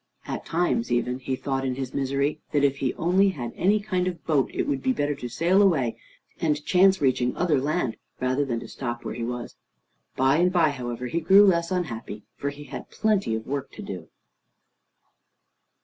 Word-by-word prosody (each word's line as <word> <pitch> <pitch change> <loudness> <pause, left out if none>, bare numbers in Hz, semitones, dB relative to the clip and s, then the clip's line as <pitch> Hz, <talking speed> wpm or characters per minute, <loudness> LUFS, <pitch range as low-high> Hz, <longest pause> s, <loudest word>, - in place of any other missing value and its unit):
At - - -5
times 180 +8 0
even, 125 +1 0
he 130 0 -2
thought 135 0 -2
in 130 -1 -1
his 130 -1 -5
misery 140 +2 0
that 145 -1 +3
if 140 -1 +3
he 135 -2 0
only 185 +4 +3
had 120 -10 -5
any 205 +4 +3
kind 185 -3 -1
of 180 - -1
a - - -21
boat, 150 -4 +1
it - - -1
would 140 -2 -1
be 260 - +1
better 145 - 0
to 130 -3 -6
sail 170 - +3
away, 135 - +3 0.4
and 150 -3 0
chance 190 +1 +5
reaching 125 -2 +1
other 155 -7 +2
land, 145 -4 -1 0.2
rather 130 +3 +1
than 120 -4 -2
to - - -8
stop 120 -2 -5
where - - -3
he 115 +1 -4
was. 120 0 -5 0.6
By 135 +2 +3
and 180 +2 +3
by, 170 -5 +3
however, 125 -2 -5
he 165 +7 -1
grew 195 +5 +7
less 170 -3 +3
unhappy, 115 - -4
for 140 - -2
he 145 +1 -9
had - - -8
plenty 210 - +1
of 110 - -5
work 140 0 -4
to - - -8
do. 90 -4 -7
140 Hz, 200 wpm, -25 LUFS, 125-175 Hz, 0.6 s, grew